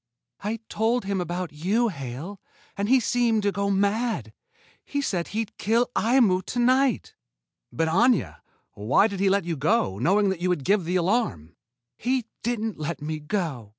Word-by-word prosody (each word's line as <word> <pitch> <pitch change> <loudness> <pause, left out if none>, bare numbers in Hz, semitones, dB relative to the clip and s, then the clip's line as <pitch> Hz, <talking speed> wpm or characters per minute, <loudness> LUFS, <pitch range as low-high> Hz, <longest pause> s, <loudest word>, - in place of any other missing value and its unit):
"I 215 +3 -2
told 225 +1 0
him 195 -1 -1
about 175 -1 -4
you, 205 +10 +1
Hale. 145 - -7 0.3
And 200 +1 -2
then 250 - +3
he - - +5
seemed 235 -2 +1
to 200 - +2
go 200 0 -1
mad. 200 - 0 0.5
He 285 - -3
said 185 -11 -1
he'd 220 0 -4
kill 235 +3 +1
Aimu 225 -6 +3
to - - -4
night." 255 +1 +2 0.6
"But, 165 0 0
Aña! 175 - +2 0.4
Why 105 - +3
did 200 -3 -2
he 195 0 +3
let 195 -2 +1
you 170 -1 -2
go, 145 - +1
knowing 195 - +3
that 190 -3 -3
you 180 - +1
would 175 -6 0
give 200 -3 +2
the 180 +2 -1
alarm?" 170 - 0 0.4
"He 250 0 0 0.2
didn't 225 -4 -2
let 155 +2 -3
me 155 +1 -4
go." 150 - -3
200 Hz, 175 wpm, -25 LUFS, 165-225 Hz, 0.6 s, he